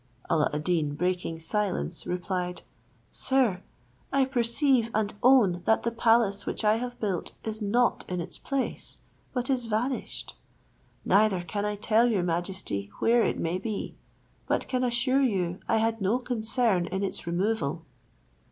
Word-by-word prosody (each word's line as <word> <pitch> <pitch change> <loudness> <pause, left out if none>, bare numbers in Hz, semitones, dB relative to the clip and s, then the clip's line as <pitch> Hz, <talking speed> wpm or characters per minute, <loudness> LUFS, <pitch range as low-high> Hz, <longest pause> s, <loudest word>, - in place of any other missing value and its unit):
Alla 160 -3 +3
ad 150 0 -3
Deen, 160 -4 0
breaking 180 0 -1
silence, 185 -1 -2
replied, 180 0 -3 0.5
"Sir, 250 -9 +1 0.5
I 275 -1 +3
perceive 245 -1 +2
and 210 -1 0
own 225 -9 +5
that 220 - +3
the 235 - 0
palace 225 -3 +2
which - - -3
I 210 +1 +4
have 245 +1 -5
built 195 -5 -2
is 220 0 -4
not 235 +4 +2
in 180 -1 -2
its 170 +1 -6
place, 275 -2 -3 0.3
but 250 -1 -2
is 255 -3 0
vanished; 230 +4 -3 0.7
neither 200 -3 +3
can 205 +4 -3
I 210 0 -1
tell 220 +3 +3
your 200 -6 +1
majesty 175 - -3
where 235 0 +4
it - - 0
may 170 +3 -1
be, 215 0 -4 0.5
but - - 0
can 255 -1 0
assure 250 +2 +2
you 185 -8 0
I 225 - +3
had 225 0 0
no 195 +5 +2
concern 230 -6 0
in 190 +3 -2
its 195 - -4
removal." 170 -3 -1
210 Hz, 150 wpm, -28 LUFS, 180-240 Hz, 0.7 s, own